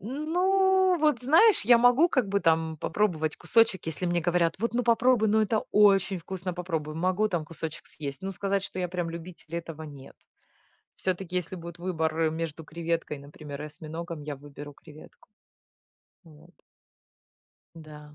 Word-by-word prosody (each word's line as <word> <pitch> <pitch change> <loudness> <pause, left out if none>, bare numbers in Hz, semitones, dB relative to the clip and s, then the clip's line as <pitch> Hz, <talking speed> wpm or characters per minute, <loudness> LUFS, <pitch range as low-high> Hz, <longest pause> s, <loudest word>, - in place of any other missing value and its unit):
Ну, 370 - +2
вот 300 -6 +2
знаешь, 335 - +5
я 240 +1 +7
могу 245 +8 +5
как 255 - 0
бы 200 0 +1
там 160 -1 +1
попробовать 160 -2 -1
кусочек, 225 -6 +2
если 165 +3 -4
мне 175 0 +1
говорят: 170 0 +1
"Вот, 230 +3 -2
ну 245 - +1
попробуй, 235 -1 +3 0.2
это 215 +1 0
очень 195 -2 +4
вкусно, 180 +1 -5
попробуй." 165 -4 -4
Могу 185 +6 +1
там 175 -5 -2
кусочек 160 -1 -7
съесть. 140 -3 -7
Но 195 - -4
сказать, 195 +1 -1
что 185 - -7
я 180 - -1
прям 175 -1 -3
любитель- 170 -1 -9
этого 165 -2 -7
нет. 145 -3 -11 0.8
Всё-таки, 185 -1 -3
если 180 +1 -3
будет 170 0 -9
выбор, 160 -3 -2
э, 160 -1 +2
между 160 0 -5
креветкой 165 -1 -3
например 145 0 -10
и - - -5
осьминогом, 160 +1 -7
я 145 -1 -5
выберу 145 +1 -10
креветку. 155 +1 -16 1.0
Вот. 155 -2 -18 1.2
Да. 150 -2 -12
175 Hz, 155 wpm, -27 LUFS, 155-210 Hz, 1.2 s, я